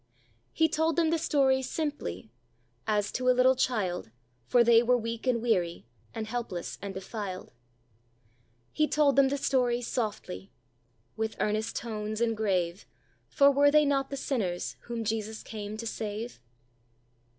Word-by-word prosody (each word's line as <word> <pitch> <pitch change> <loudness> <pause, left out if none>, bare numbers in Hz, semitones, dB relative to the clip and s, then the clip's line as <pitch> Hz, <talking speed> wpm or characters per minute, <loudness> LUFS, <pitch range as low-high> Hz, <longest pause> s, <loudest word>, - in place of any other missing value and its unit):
He 320 - +3
told 320 0 +1
them 325 0 +2
the 330 - +1
story 275 -4 +3
simply: 260 - -4 0.6
'As 205 -1 +1
to 255 0 0
a 250 - +4
little 255 +1 +6
child, 195 - -1 0.4
For 245 - +5
they 230 -1 +6
were 245 +1 +3
weak 230 +1 -4
and 235 -2 +1
weary, 175 - 0 0.3
And 220 - -4
helpless 220 -6 -4
and 200 -1 -6
defi'ed.' 190 -1 -6 1.2
He 305 - +2
told 295 -2 +3
them 275 -1 +5
the 280 - -1
story 250 -3 +1
softly: 215 -5 -4 0.7
'With 220 0 -2
earnest 215 +1 -1
tones 215 -2 -4
and 230 -1 +1
grave, 185 -4 -1 0.4
For 280 -1 +5
were 285 +1 +5
they 300 +1 +5
not 275 -1 +1
the 275 - -4
sinners 200 -11 -2
Whom 235 -1 -4
Jesus 220 0 -3
came 210 -1 -6
to 230 - -6
save?'" 220 +1 -5
230 Hz, 150 wpm, -29 LUFS, 210-265 Hz, 1.2 s, little